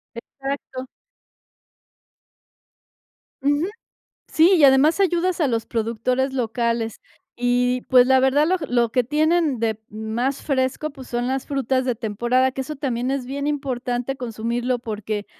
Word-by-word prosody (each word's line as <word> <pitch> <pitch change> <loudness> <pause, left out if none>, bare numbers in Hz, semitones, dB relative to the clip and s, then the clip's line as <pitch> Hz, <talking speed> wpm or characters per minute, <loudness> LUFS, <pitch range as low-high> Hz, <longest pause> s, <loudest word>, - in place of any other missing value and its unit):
Exacto. 270 +1 -6 2.6
Ujú. 290 +4 +2 0.6
Sí, 330 +4 +4
y 305 - +5
además 280 +6 +5
ayudas 360 -1 +1
a 310 - +3
los 230 -2 -1
productores 235 +4 -1
locales, 230 -2 -1 0.4
y 245 +1 +1
pues 250 -1 +6
la 265 0 +5
verdad 270 +3 +3
lo 370 +3 +2
g 300 - -5
lo 240 -1 +2
que 250 - +3
tienen 310 0 +1
de, 220 -1 -1
mm, 215 - -11 0.2
más 265 +4 -1
fresco, 270 +2 -1
pues, 270 -3 -12
son 240 0 -2
las 265 0 -2
frutas 265 -2 0
de 250 -1 0
temporada, 240 +4 0
que 265 - -5
eso 305 +3 -7
también 255 -2 -2
es 270 -2 -2
bien 280 +2 -3
importante 260 -3 -2
consumirlo 240 +1 -2
porque 215 -2 -4
255 Hz, 145 wpm, -22 LUFS, 240-280 Hz, 2.6 s, pues